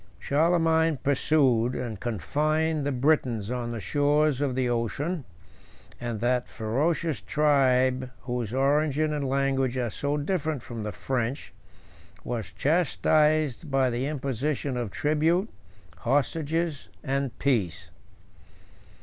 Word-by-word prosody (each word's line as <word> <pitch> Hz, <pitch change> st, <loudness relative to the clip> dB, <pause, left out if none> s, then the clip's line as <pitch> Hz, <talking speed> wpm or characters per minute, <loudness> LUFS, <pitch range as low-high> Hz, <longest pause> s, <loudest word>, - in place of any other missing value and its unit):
Charlemagne 160 Hz, 0 st, +2 dB
pursued, 130 Hz, -3 st, +2 dB
and 115 Hz, -5 st, -4 dB
confined, 150 Hz, -, 0 dB
the -, -, 0 dB
Britons 125 Hz, -5 st, +1 dB
on 125 Hz, -1 st, -2 dB
the 115 Hz, -1 st, -4 dB
shores 145 Hz, +4 st, +2 dB
of 135 Hz, -3 st, 0 dB
the 130 Hz, -1 st, +1 dB
ocean; 130 Hz, -, -2 dB, 0.7 s
and 120 Hz, -3 st, -4 dB
that 125 Hz, +1 st, +1 dB
ferocious 150 Hz, +8 st, -1 dB
tribe, 130 Hz, -3 st, +2 dB
whose 120 Hz, -3 st, -3 dB
origin 145 Hz, +3 st, +2 dB
and 140 Hz, -3 st, -2 dB
language 135 Hz, -1 st, +1 dB
are 120 Hz, -3 st, -1 dB
so 145 Hz, +5 st, -1 dB
different 155 Hz, -4 st, -2 dB
from 115 Hz, -2 st, -6 dB
the 105 Hz, 0 st, -3 dB
French, 125 Hz, +2 st, -3 dB, 0.7 s
was 115 Hz, -3 st, -4 dB
chastised 155 Hz, -2 st, +2 dB
by 135 Hz, -2 st, +2 dB
the 125 Hz, +3 st, -1 dB
imposition 140 Hz, -1 st, -2 dB
of 120 Hz, -3 st, -2 dB
tribute, 160 Hz, -, +1 dB, 0.5 s
hostages, 145 Hz, -, -1 dB
and 135 Hz, -3 st, -2 dB
peace. 90 Hz, -10 st, -1 dB
135 Hz, 115 wpm, -27 LUFS, 120-150 Hz, 0.7 s, Charlemagne